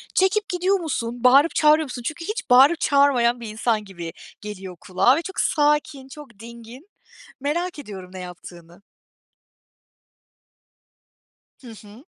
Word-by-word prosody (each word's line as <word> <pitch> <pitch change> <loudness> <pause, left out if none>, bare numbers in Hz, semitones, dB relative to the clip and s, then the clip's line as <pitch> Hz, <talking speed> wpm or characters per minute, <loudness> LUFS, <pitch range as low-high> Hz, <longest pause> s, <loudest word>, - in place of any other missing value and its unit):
Çekip 405 +2 +1
gidiyor 370 +2 0
musun? 245 -7 -4
Bağırıp 275 +6 +5
çağırıyor 305 0 +4
musun? 250 -2 -8
Çünkü 325 +2 -5
hiç 425 -4 -5
bağırıp 270 +7 +6
çağırmayan 255 -4 +2
bir 230 - -7
insan 215 0 -1
gibi 175 -4 -8 0.3
geliyor 190 -3 -8
kulağa 200 +7 +2
ve 330 - -2
çok 380 - -7
sakin, 295 -2 0
çok 265 -7 -14
dingin. 235 - -13 0.5
Merak 325 +4 -3
ediyorum 190 -7 -10
ne 185 - -8
yaptığını. 175 0 -12 2.8
Hı 245 - -12
hı. 220 +3 -14
250 Hz, 130 wpm, -22 LUFS, 210-305 Hz, 2.8 s, bağırıp